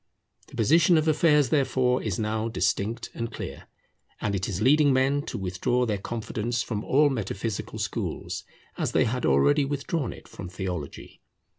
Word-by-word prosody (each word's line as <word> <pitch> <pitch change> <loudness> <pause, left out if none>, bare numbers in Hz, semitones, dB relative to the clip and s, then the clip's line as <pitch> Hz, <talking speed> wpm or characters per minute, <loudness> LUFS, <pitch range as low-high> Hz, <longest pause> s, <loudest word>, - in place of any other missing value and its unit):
The - - -13
position 165 - +4
of 155 0 +1
affairs, 150 -2 +4
therefore, 130 -4 +2
is 105 -5 -2
now 110 +1 -1
distinct 115 +1 -1
and 115 -1 -4
clear; - - -7 0.5
and 105 - -1
it 95 -1 -1
is 95 -2 -3
leading 145 +5 +5
men 135 +2 +2
to 125 - -4
withdraw 100 +6 0
their 105 -4 -1
confidence 115 +2 -3
from 110 -2 -4
all 145 +2 +3
metaphysical 110 -3 -3
schools, - - -3 0.4
as - - -1
they - - +4
had 125 +2 -1
already 140 - +4
withdrawn 140 0 -2
it - - -12
from 90 - -8
theology. 90 -5 -6
120 Hz, 160 wpm, -26 LUFS, 105-140 Hz, 0.5 s, leading